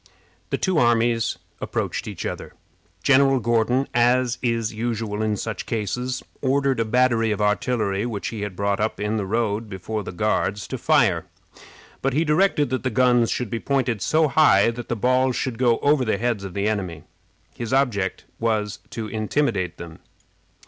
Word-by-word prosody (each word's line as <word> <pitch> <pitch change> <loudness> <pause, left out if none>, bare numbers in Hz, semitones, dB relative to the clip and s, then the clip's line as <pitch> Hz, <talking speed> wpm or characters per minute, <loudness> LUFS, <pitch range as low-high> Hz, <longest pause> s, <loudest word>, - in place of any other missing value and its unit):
The - - 0
two 185 -4 +1
armies 120 -1 +2 0.2
approached - - -3
each - - -6
other. - - -5 0.5
General 135 -1 +4
Gordon, 120 +3 +1
as 120 0 +2
is 115 -3 -1
usual 110 -2 -3
in 110 -1 0
such 110 +2 -5
cases, 125 +4 -2 0.2
ordered 135 -1 +1
a 115 - +1
battery 115 -1 +2
of 105 -1 -1
artillery 105 0 0
which 105 -4 -4
he 110 -3 -6
had 100 -3 -4
brought 100 +1 0
up 110 +1 -1
in 105 +2 -1
the 100 -3 -2
road 110 0 -1
before 105 +3 -4
the 100 - -6
Guards 105 0 -1
to - - -4
fire, - - +2 0.7
but 135 0 0
he 155 +4 +2
directed 150 -3 +2
that 130 - -1
the 130 - -1
guns 120 0 +3
should 125 -4 -2
be 115 - -2
pointed 125 -5 0
so 155 - +3
high 115 -8 +5
that 120 0 -8
the 120 - 0
balls 130 +3 +2
should 125 -3 -3
go 120 -3 +3
over 145 -2 +4
the 110 -4 0
heads 115 -2 -1
of 95 -3 -7
the 100 +1 0
enemy. 95 -7 -3 0.5
His 120 -1 -5
object 120 -9 0
was 105 -3 -1
to 115 - -5
intimidate 110 - -1
them. 85 -2 -10
115 Hz, 175 wpm, -23 LUFS, 105-130 Hz, 0.7 s, high